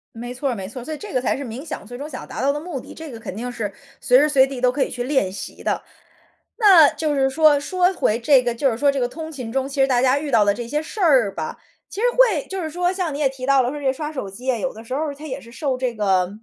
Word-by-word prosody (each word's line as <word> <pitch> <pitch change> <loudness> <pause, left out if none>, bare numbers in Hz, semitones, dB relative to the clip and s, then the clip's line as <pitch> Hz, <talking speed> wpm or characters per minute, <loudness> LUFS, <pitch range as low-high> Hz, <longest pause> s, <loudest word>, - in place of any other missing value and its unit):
没 240 +2 -6
错 265 +2 -2
儿 - - -3
没 190 -3 -6
错 250 +3 -8
儿。 - - -10
所 315 - -4
以 - - -5
这 415 +4 -9
个 255 - +1
才 250 - 0
是 280 - -5
冥 250 +3 -7
想 315 - -6
最 245 +3 -9
终 290 +3 -6
想 255 - -7
要 - - -11
达 - - -5
到 275 +2 +3
的 295 - -3
目 315 -3 -5
的， - - -11
这 320 -3 -9
个 230 - -9
肯 205 - -7
定 245 +3 -4
是 210 -4 -4 0.3
随 250 - +4
时 300 +2 +3
随 270 -3 +5
地 265 -2 -6
都 250 - +4
可 270 +1 +1
以 - - -3
去 245 0 -4
练 255 -8 +1
习 195 - -8
的。 - - 0 0.8
那 380 -10 +8
就 305 -2 -2
是 270 -1 +2
说 300 +1 +4
说 360 +5 +1
回 225 - +1
这 265 +1 +4
个 240 -1 -1
就 270 +3 +2
是 225 - -3
说 280 +3 +3
这 275 - -2
个 245 - +1
通 315 +5 -7
勤 255 -7 -6
中， 270 +2 -1
其 275 0 -1
实 270 - +5
大 245 -2 +2
家 260 +1 +3
遇 290 -1 -5
到 210 - +5
的 205 - +3
这 240 +2 -6
些 295 +5 -1
事 330 +7 -7
儿 260 - +4
吧， 160 -1 -4 0.3
其 405 - -7
实 - - +4
会 445 - +4
就 385 -1 -4
是 315 - -3
说 355 +3 0
像 365 -5 -2
你 - - -5
也 290 - +3
提 260 -1 -7
到 275 0 +4
了 245 - 0
说 295 - -5
这 285 - -7
个 265 - +4
刷 300 +3 -5
手 260 -9 -5
机 250 +7 -3
啊， 245 - -1
有 260 +4 -2
的 220 - -11
时 230 - -7
候 300 0 -2
他 295 +2 -11
也 260 - -5
是 230 - -14
受 265 0 -2
这 255 -1 -1
个 190 -4 +2
270 Hz, 350 characters per minute, -22 LUFS, 245-300 Hz, 0.8 s, 那